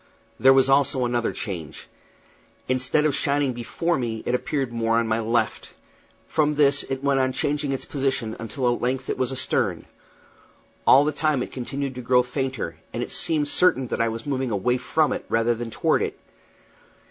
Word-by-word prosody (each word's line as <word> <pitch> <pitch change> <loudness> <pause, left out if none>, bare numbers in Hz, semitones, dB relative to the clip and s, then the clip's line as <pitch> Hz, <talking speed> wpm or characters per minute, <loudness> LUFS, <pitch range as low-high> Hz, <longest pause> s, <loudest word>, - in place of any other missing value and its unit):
There 135 - +7
was 135 0 +5
also 135 -1 +3
another 120 -1 0
change. 85 -8 -6 0.8
Instead 130 +4 +1
of 145 -3 +2
shining 140 -2 +1
before 135 +7 -2
me, 115 -3 -3
it 120 - -1
appeared 135 -1 -1
more 115 0 +1
on 115 -1 +1
my 110 +1 +1
left. 115 +1 -1 0.5
From 150 -1 +1
this 140 -1 +3
it 135 0 -3
went 140 -1 +2
on 130 0 +1
changing 145 +1 -1
its 135 - -3
position 130 -5 -2
until 120 +2 -1
at - - -5
length 130 +1 -1
it - - -3
was 130 -1 0
astern. 130 - 0 1.0
All 140 +2 +7
the 150 - +1
time 150 -3 +1
it - - -8
continued 135 +2 -4
to 125 - -7
grow 125 +1 +3
fainter, 130 0 -4
and - - -3
it - - -7
seemed 150 -3 +1
certain 145 -6 +3
that - - -1
I 115 - +2
was 115 0 -6
moving 135 -3 -1
away 115 +4 +1
from 155 +4 +1
it - - -5
rather 115 +1 +2
than 120 0 -5
toward - - +1
it. - - -3
130 Hz, 185 wpm, -24 LUFS, 120-140 Hz, 1.0 s, There